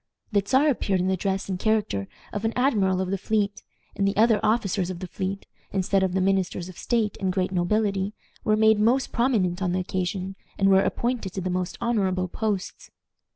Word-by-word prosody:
The 205 -2 +3
Czar 265 +8 +3
appeared 195 -8 0
in 185 +1 +1
the 190 - +2
dress 195 +1 -2
and 185 -2 -3
character 210 - 0 0.3
of 205 - -3
an 225 0 0
admiral 205 -8 +2
of 185 0 -2
the 195 - -1
fleet, 205 0 0 0.3
and 195 - +1
the 195 - -1
other 220 -1 +5
officers 200 -4 +1
of 185 - -4
the 185 - -6
fleet, 190 +2 -4 0.3
instead 195 0 +1
of 190 -1 +1
the 190 - +2
ministers 185 -2 0
of 185 - -11
state 225 -4 0
and 190 -1 +1
great 185 0 -1
nobility, 195 +2 0 0.3
were 215 -1 +2
made 220 -1 +5
most 245 +5 +2
prominent 205 -8 +1
on 180 -2 0
the 185 - +1
occasion, 185 +1 -3 0.2
and 195 0 +3
were 190 0 +6
appointed 235 -6 -1
to 190 - -3
the 185 0 -2
most 180 0 -2
honorable 195 -6 0
posts. 205 0 -3
195 Hz, 200 wpm, -25 LUFS, 185-215 Hz, 0.3 s, were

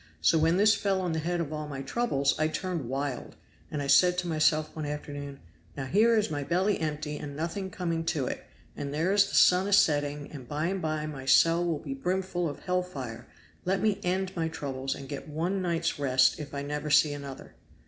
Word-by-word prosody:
So 155 - +4
when 165 +3 +3
this 210 +2 +6
fell 200 -2 0
on 180 -2 -1
the 160 - -1
head 175 +2 -1
of 155 -2 -3
all 150 0 -4
my 135 -2 -5
troubles 140 - +1
I 155 - +3
turned 165 -5 -3
wild, 135 0 -3 0.3
and 150 -2 -3
I - - -3
said 180 +6 +5
to 180 -1 -1
myself 155 -1 +2
one 155 -2 -4
afternoon, 145 -1 -6 0.4
'Now 135 - -3
here 220 - +4
is 215 0 +1
my 145 -1 -2
belly 185 +7 +1
empty 150 -1 -3
and 145 -1 -7
nothing 170 +5 -3
coming 170 -3 -2
to 155 -5 0
it, - - -4 0.3
and 140 -1 -4
there 165 +6 +1
is 200 -1 +4
the - - -4
sun 180 +2 +5
a 205 - 0
setting, 145 -5 +2
and 130 -5 -9
by 150 +3 -2
and 190 -1 -2
by 155 -1 -2
my 140 -4 -6
cell 165 +5 +5
will 170 -3 0
be 140 -2 -6
brimful 180 +3 -1
of 145 - -8
hell 180 0 0
fire 135 -11 -7 0.4
let 190 +2 +1
me 210 0 +1
end 190 +1 -1
my 165 -2 0
troubles 135 -4 -4
and 135 - -9
get 140 +2 -7
one 175 +6 -1
night's 170 -3 -1
rest 130 -2 +3
if 145 -2 -7
I 140 - -3
never 150 +1 -3
see 145 0 +5
another.' 140 -2 -8
155 Hz, 220 wpm, -28 LUFS, 145-180 Hz, 0.4 s, this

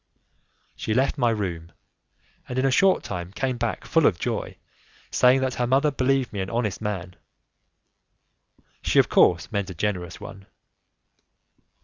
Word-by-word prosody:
She 110 - -2
left 135 +3 +1
my 120 -2 +3
room, 85 -7 -3 0.8
and 125 - -4
in 130 - +2
a 135 - +3
short 190 +7 +3
time 90 0 -5
came 125 +4 -2
back 120 -1 -3
full 165 -2 +3
of 85 - +1
joy, - - -3 0.5
saying 130 +1 +4
that 130 -1 0
her 120 0 -1
mother 140 +4 +3
believed 135 -2 0
me 100 - -4
an 95 - -4
honest 115 -4 -2
man; 95 -4 -4 1.7
she - - 0
of - - +6
course 85 +4 +3
meant 100 -3 -2
a 95 - -7
generous 90 -2 -3
one. 95 -1 -11
110 Hz, 150 wpm, -24 LUFS, 95-130 Hz, 1.7 s, of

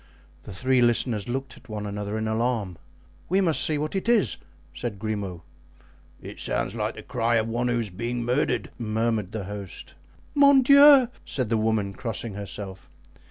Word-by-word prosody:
The - - -11
three 130 +6 +1
listeners 120 -2 +1
looked 135 +2 -4
at - - -19
one 105 -1 -5
another 105 +1 -4
in 110 0 -2
alarm. 110 -5 -1 0.5
"We 190 +3 +3
must 170 -5 +2
see 155 - +1
what 155 +5 -3
it 195 +4 -1
is," 215 - +3 0.4
said 120 -5 -5
Grimaud. 100 -4 -4 0.8
"It - - -10
sounds - - -2
like - - -3
the - - -9
cry 120 -1 0
of 110 -1 +1
one 120 +2 -1
who 120 -1 +1
is 110 -4 -3
being 120 +6 -3
murdered," 125 +5 0
murmured 110 -3 -1
the 110 -2 -4
host. 100 -1 -8 0.4
"Mon 280 -2 +6
Dieu!" 280 -1 +8 0.2
said 130 -5 -2
the 115 - +2
woman, 110 -2 0
crossing 115 0 -4
herself. 100 -1 -8
115 Hz, 170 wpm, -25 LUFS, 105-130 Hz, 0.8 s, Dieu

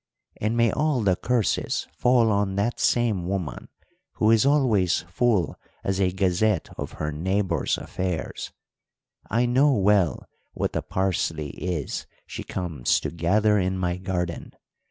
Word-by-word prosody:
'And 110 +3 -1
may 115 -1 +4
all 150 -4 +1
the 95 -3 +3
curses 115 0 0
fall 120 -3 +3
on 100 -1 0
that 105 +4 -1
same 110 -8 +1
woman, 95 -4 -3 0.5
who 110 - +3
is 115 +4 +4
always 115 - +3
full 100 -2 +1 0.3
as 95 0 0
a 90 -1 +2
gazette 95 0 +1
of - - -6
her 75 0 -3
neighbours' 90 +1 0
affairs! 90 -3 -4 0.8
I 115 +4 +2
know 135 +4 +4
well 100 - +2 0.3
what - - -2
the - - -1
parsley 80 -5 -1
is 85 -6 -4 0.2
she - - -7
comes 80 -9 -1
to - - -3
gather 105 +6 +2
in 95 0 0
my 90 -1 -1
garden. 90 -2 -4
95 Hz, 140 wpm, -25 LUFS, 90-115 Hz, 0.8 s, may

